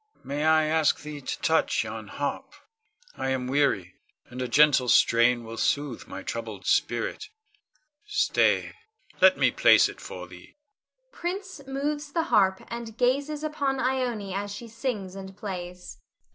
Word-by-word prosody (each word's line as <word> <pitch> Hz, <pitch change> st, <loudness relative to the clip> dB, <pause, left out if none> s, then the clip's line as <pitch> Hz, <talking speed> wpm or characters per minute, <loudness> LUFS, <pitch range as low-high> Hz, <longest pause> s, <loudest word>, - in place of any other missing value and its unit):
May 145 Hz, +3 st, -2 dB
I 160 Hz, 0 st, +5 dB
ask 155 Hz, -1 st, +2 dB
thee 150 Hz, -1 st, -7 dB
to 130 Hz, -, -4 dB
touch 160 Hz, -5 st, +2 dB
yon 110 Hz, -1 st, -7 dB
harp? 145 Hz, +5 st, -4 dB, 0.6 s
I 135 Hz, -, -2 dB
am 130 Hz, -1 st, -1 dB
weary, 125 Hz, -10 st, +1 dB, 0.3 s
and 125 Hz, +1 st, -8 dB
a 125 Hz, -, -1 dB
gentle 140 Hz, -1 st, +4 dB
strain 120 Hz, +1 st, +4 dB
will 115 Hz, 0 st, -8 dB
sooth 145 Hz, +5 st, -1 dB
my -, -, -7 dB
troubled -, -, -6 dB
spirit. -, -, 0 dB, 0.8 s
Stay! 420 Hz, 0 st, +2 dB, 0.5 s
let 190 Hz, 0 st, +7 dB
me 135 Hz, -3 st, +3 dB
place -, -, +6 dB
it -, -, -10 dB
for 90 Hz, -1 st, -8 dB
thee. 90 Hz, 0 st, -15 dB, 0.6 s
[Prince 375 Hz, -4 st, -5 dB
moves 290 Hz, +2 st, -3 dB
the 330 Hz, -, +1 dB
harp 190 Hz, -2 st, +3 dB
and 230 Hz, -1 st, -7 dB
gazes 280 Hz, +5 st, 0 dB
upon 285 Hz, -3 st, -1 dB
Ione 245 Hz, -7 st, -1 dB
_as 200 Hz, +1 st, -3 dB
she 235 Hz, -, -9 dB
sings 225 Hz, -5 st, -4 dB
and 190 Hz, 0 st, -9 dB
plays. 180 Hz, -, -7 dB
190 Hz, 145 wpm, -26 LUFS, -, 0.8 s, let